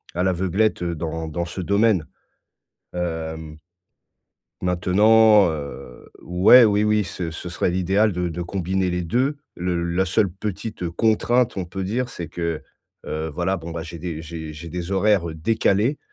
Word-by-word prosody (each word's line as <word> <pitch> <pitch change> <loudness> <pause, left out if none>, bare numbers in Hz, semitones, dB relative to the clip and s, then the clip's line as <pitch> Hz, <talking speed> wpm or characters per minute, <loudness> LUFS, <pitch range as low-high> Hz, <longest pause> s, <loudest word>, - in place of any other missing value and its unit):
à 90 - 0
l'aveuglette 95 +3 +1
dans 80 -1 -3
dans 85 +2 -3
ce 85 +3 -7
domaine. 100 -2 +2 0.9
Hem 80 -3 -4 1.0
maintenant, 105 +3 +5
heu, 70 -5 -8
ouais, 95 +8 +6
oui, 105 -1 +3
oui, 105 -1 +2
ce 85 -1 -5
ce 85 +2 -7
serait 90 +1 -1
l'idéal 95 +4 +2
de 90 0 -1
de 85 +1 -4
combiner 95 +1 -1
les 90 0 -1
2. 130 - 0 0.2
Le 90 -1 -2
la 85 +2 +1
seule 95 +2 +2
petite 100 0 -5
contrainte, 115 +5 +2
on 95 - -2
peut 95 +2 -5
dire, 120 +6 -1
c'est 85 -8 -6
que, 85 0 -3 0.5
heu, 80 +1 -3
voilà, 90 +4 -1
bon 85 -1 -8
bah, 85 0 -5
j'ai 85 0 -8
des 80 -1 -5
j'ai 80 -1 -7
j'ai 80 +2 -9
des 90 +2 -5
horaires 95 -2 +2
décalés. 105 - +1
90 Hz, 155 wpm, -22 LUFS, 85-105 Hz, 1.0 s, ouais